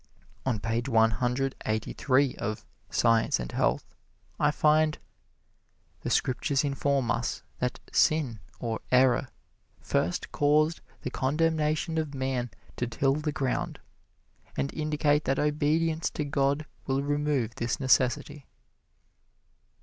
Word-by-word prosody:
On 120 Hz, -5 st, +1 dB
page 115 Hz, +4 st, -2 dB
one 115 Hz, -2 st, +4 dB
hundred 125 Hz, +5 st, 0 dB
eighty 110 Hz, 0 st, -1 dB
three 135 Hz, -1 st, +2 dB
of 110 Hz, 0 st, -4 dB, 0.2 s
"Science 115 Hz, -1 st, +3 dB
and -, -, -5 dB
Health" -, -, 0 dB, 0.5 s
I 150 Hz, -, +4 dB
find, 155 Hz, +1 st, +3 dB, 1.0 s
"The -, -, -3 dB
Scriptures 135 Hz, +2 st, +1 dB
inform 140 Hz, -2 st, 0 dB
us 115 Hz, 0 st, -2 dB, 0.2 s
that 125 Hz, 0 st, -2 dB
sin, 140 Hz, -8 st, +2 dB, 0.2 s
or 115 Hz, -2 st, -2 dB
error, 130 Hz, 0 st, +4 dB, 0.5 s
first 90 Hz, +2 st, -1 dB
caused 155 Hz, +2 st, +2 dB, 0.2 s
the 130 Hz, -, -3 dB
condemnation 155 Hz, +3 st, 0 dB
of 150 Hz, -3 st, -3 dB
man 130 Hz, -2 st, -1 dB, 0.3 s
to 120 Hz, -, -1 dB
till 135 Hz, +4 st, +1 dB
the 150 Hz, +1 st, -2 dB
ground, 135 Hz, -3 st, -2 dB, 0.8 s
and 140 Hz, -, -1 dB
indicate 150 Hz, -1 st, +1 dB
that 135 Hz, +1 st, +1 dB
obedience 155 Hz, +2 st, +1 dB
to 150 Hz, -, 0 dB
God 140 Hz, +1 st, +1 dB, 0.2 s
will 135 Hz, +1 st, +1 dB
remove 145 Hz, -5 st, 0 dB
this 120 Hz, +1 st, -2 dB
necessity." 135 Hz, +2 st, +1 dB
135 Hz, 120 wpm, -28 LUFS, 125-150 Hz, 1.0 s, one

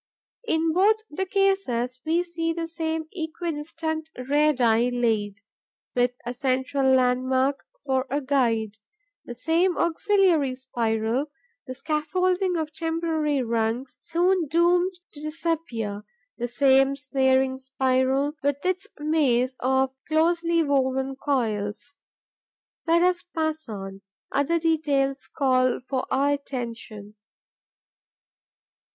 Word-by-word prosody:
In 320 Hz, -3 st, +1 dB
both 400 Hz, +5 st, +5 dB, 0.3 s
cases, 320 Hz, -, +1 dB
we 335 Hz, +2 st, +2 dB
see 330 Hz, -1 st, -2 dB
the 335 Hz, 0 st, -3 dB
same 320 Hz, -1 st, -3 dB
equidistant 320 Hz, -1 st, -4 dB
radii 250 Hz, -4 st, +2 dB
laid, 220 Hz, -5 st, -1 dB, 0.5 s
with 245 Hz, 0 st, +2 dB
a 245 Hz, -, -3 dB
central 265 Hz, +1 st, +1 dB
landmark 260 Hz, +2 st, +1 dB, 0.2 s
for 265 Hz, -1 st, 0 dB
a 280 Hz, +3 st, 0 dB
guide; 230 Hz, -6 st, 0 dB, 0.5 s
the 240 Hz, -, -7 dB
same 330 Hz, +7 st, +1 dB
auxiliary 340 Hz, -5 st, +2 dB
spiral, 235 Hz, 0 st, -1 dB, 0.4 s
the 255 Hz, -, -6 dB
scaffolding 360 Hz, +5 st, 0 dB
of 310 Hz, -1 st, -3 dB
temporary 320 Hz, -4 st, -1 dB
rungs, 230 Hz, +2 st, -2 dB
soon 345 Hz, 0 st, +1 dB
doomed 350 Hz, +4 st, +3 dB, 0.2 s
to 295 Hz, -, -10 dB
disappear; 305 Hz, -10 st, -3 dB, 0.3 s
the 240 Hz, -, -3 dB
same 270 Hz, +2 st, +4 dB
snaring 265 Hz, -1 st, +1 dB
spiral, 265 Hz, +2 st, +1 dB
with 285 Hz, +2 st, -1 dB
its 370 Hz, +2 st, -1 dB
maze 270 Hz, -5 st, +1 dB
of 265 Hz, +1 st, +1 dB
closely 335 Hz, +1 st, +2 dB
woven 265 Hz, -2 st, 0 dB
coils. 230 Hz, -2 st, -2 dB, 0.9 s
Let 335 Hz, +1 st, +4 dB
us 360 Hz, -1 st, +2 dB
pass 315 Hz, -4 st, -3 dB
on: 195 Hz, -2 st, -7 dB, 0.3 s
other 285 Hz, +4 st, +1 dB
details 290 Hz, -4 st, 0 dB
call 255 Hz, -2 st, +2 dB
for 260 Hz, +1 st, -3 dB
our 280 Hz, +2 st, +2 dB
attention. 235 Hz, -6 st, -6 dB
275 Hz, 105 wpm, -25 LUFS, 255-325 Hz, 0.9 s, both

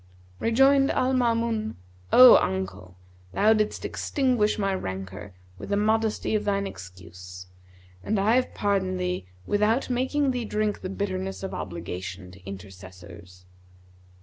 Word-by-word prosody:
Rejoined 270 Hz, +4 st, +4 dB
Al 255 Hz, +1 st, +1 dB
Maamun, 230 Hz, -3 st, 0 dB, 0.4 s
'O 255 Hz, 0 st, +10 dB
uncle, 95 Hz, -1 st, -3 dB, 0.4 s
thou 215 Hz, +2 st, +4 dB
didst 215 Hz, -1 st, -1 dB
extinguish 250 Hz, -7 st, 0 dB
my 195 Hz, -2 st, 0 dB
rancour 95 Hz, -, -6 dB, 0.2 s
with -, -, -8 dB
the 200 Hz, -, +1 dB
modesty 220 Hz, +1 st, 0 dB
of 215 Hz, -, +1 dB
thine 200 Hz, -1 st, 0 dB
excuse, 90 Hz, -, -10 dB, 0.6 s
and 215 Hz, -, -1 dB
I 210 Hz, +3 st, +3 dB
have 255 Hz, 0 st, 0 dB
pardoned 190 Hz, -2 st, 0 dB
thee 180 Hz, -, -3 dB, 0.2 s
without 220 Hz, +6 st, +1 dB
making 265 Hz, +3 st, 0 dB
thee 250 Hz, -1 st, -3 dB
drink 210 Hz, -1 st, -2 dB
the 185 Hz, -, -5 dB
bitterness 195 Hz, -1 st, -4 dB
of 190 Hz, -, -5 dB
obligation 90 Hz, +1 st, -6 dB
to 90 Hz, +1 st, -16 dB
intercessors.' 95 Hz, -2 st, -12 dB
195 Hz, 130 wpm, -25 LUFS, -, 0.6 s, O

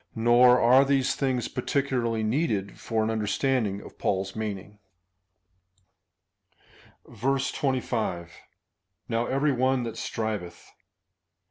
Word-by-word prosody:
Nor 120 Hz, +2 st, +5 dB
are 125 Hz, +3 st, +6 dB
these 135 Hz, -1 st, +1 dB
things 130 Hz, -3 st, -1 dB
particularly 125 Hz, -4 st, -1 dB
needed 110 Hz, -4 st, -1 dB
for 110 Hz, -1 st, -1 dB
understanding 110 Hz, -1 st, 0 dB, 0.2 s
Paul's 95 Hz, 0 st, -1 dB
meaning. 105 Hz, -1 st, -5 dB, 2.3 s
25. 125 Hz, -, -2 dB, 0.8 s
Now 115 Hz, +1 st, -1 dB
every 140 Hz, +2 st, +1 dB
one 130 Hz, 0 st, +1 dB
that 115 Hz, -1 st, -6 dB
striveth. 105 Hz, -7 st, -5 dB
120 Hz, 85 wpm, -26 LUFS, 110-130 Hz, 2.3 s, are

